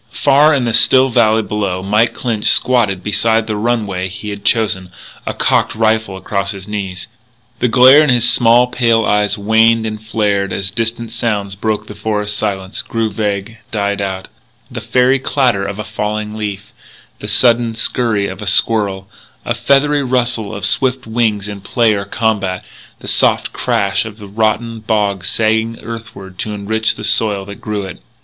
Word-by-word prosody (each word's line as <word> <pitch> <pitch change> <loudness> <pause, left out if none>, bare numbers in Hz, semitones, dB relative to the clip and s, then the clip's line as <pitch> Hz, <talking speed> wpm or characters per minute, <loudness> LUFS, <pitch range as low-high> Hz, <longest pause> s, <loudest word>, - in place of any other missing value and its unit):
Far 145 +2 +4
in 130 -3 0
the 115 - -1
still 130 +4 +5
valley 110 -2 +3
below, 100 -4 -3
Mike 105 +4 +1
Clinch 115 -4 -2
squatted 110 -7 +2
beside 110 +2 +1
the 110 -1 -3
runway 105 -4 -1
he 100 +3 -7
had 100 0 -7
chosen, 105 -5 0 0.4
a - - -1
cocked - - +1
rifle 110 -3 0
across 100 0 -3
his 95 0 -9
knees. 95 -3 -5 0.5
The 125 - +2
glare 130 +5 +7
in 150 - +1
his 120 -3 +4
small, 120 +1 +5
pale 115 -3 +1
eyes 105 0 +1
waned 110 +2 +3
and 110 -1 -5
flared 105 -3 -1
as 95 0 -3
distant 115 +1 -2
sounds 105 -4 -2
broke 105 +2 -2
the - - -9
forest 105 0 -2
silence, 95 -2 -3
grew 115 -1 -2
vague, 105 +2 -3
died 100 -2 -1
out, 95 -1 -4 0.4
the - - -6
fairy 130 +1 +2
clatter 125 -7 +1
of 100 0 -4
a 105 - -4
falling 105 0 -4
leaf, 100 -2 -6 0.5
the - - -7
sudden 120 -2 +3
scurry 110 -2 0
of - - -8
a 105 - -5
squirrel, 100 -1 +1 0.4
a 120 - 0
feathery 140 +5 +2
rustle 125 -4 -1
of 100 - -3
swift 130 -1 +1
wings 110 -3 -1
in 100 -1 -7
play 115 +2 +1
or 100 -1 -3
combat, 100 -4 -1 0.4
the - - -10
soft - - +2
crash 100 +2 0
of 110 0 -9
a 105 - -9
rotten 110 +2 -1
bough 105 -3 0
sagging 110 +3 0
earthward 110 -5 -9
to 105 -1 -3
enrich 110 +2 -1
the 105 - -9
soil 105 -2 +1
that 100 0 -10
grew 105 -2 -3
it. 95 -9 -9
110 Hz, 170 wpm, -16 LUFS, 100-115 Hz, 0.5 s, glare